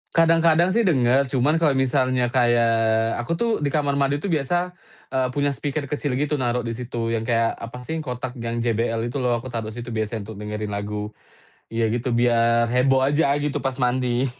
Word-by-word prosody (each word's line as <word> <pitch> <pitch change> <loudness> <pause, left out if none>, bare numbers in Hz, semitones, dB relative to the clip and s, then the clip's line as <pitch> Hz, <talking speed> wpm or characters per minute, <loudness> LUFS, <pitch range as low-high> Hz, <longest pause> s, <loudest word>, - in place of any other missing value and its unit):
Kadang-kadang 165 +1 +4
sih 230 0 +2
denger, 130 -3 +3
cuman 150 +6 +2
kalau 150 -4 +3
misalnya 130 -2 +1
kayak, 120 -2 +3 0.5
aku 120 +6 -4
tuh 235 +6 0
di 145 - 0
kamar 140 -1 0
mandi 140 +1 +2
tuh 195 - -2
biasa, 155 +2 0 0.6
eee, 130 -1 +1
punya 145 0 +1
speaker 145 +2 -3
kecil 145 -1 -2
gitu 145 +2 -1
naruh 125 -1 0
di 115 - -3
situ 115 -1 -4
yang 115 +1 -2
kayak 115 -1 +2
apa 115 +2 -7
sih, 160 +5 -4
kotak 125 -3 -4
yang 115 0 -3
JBL 115 0 0
itu 140 - -4
loh, 125 -2 +1
aku 120 +2 -6
taruh 115 -2 -4
situ 120 0 -7
biasanya 110 0 -2
untuk 105 - -9
dengerin 105 0 -4
lagu. 105 +1 -4 0.6
Iya 115 0 0
gitu, 120 +1 -2
biar 115 0 +3
heboh 130 +1 +3
aja 145 +3 +2
gitu 145 -1 -1
pas 135 -1 -2
mandi. 125 0 +1
125 Hz, 190 wpm, -23 LUFS, 115-140 Hz, 0.6 s, Kadang-kadang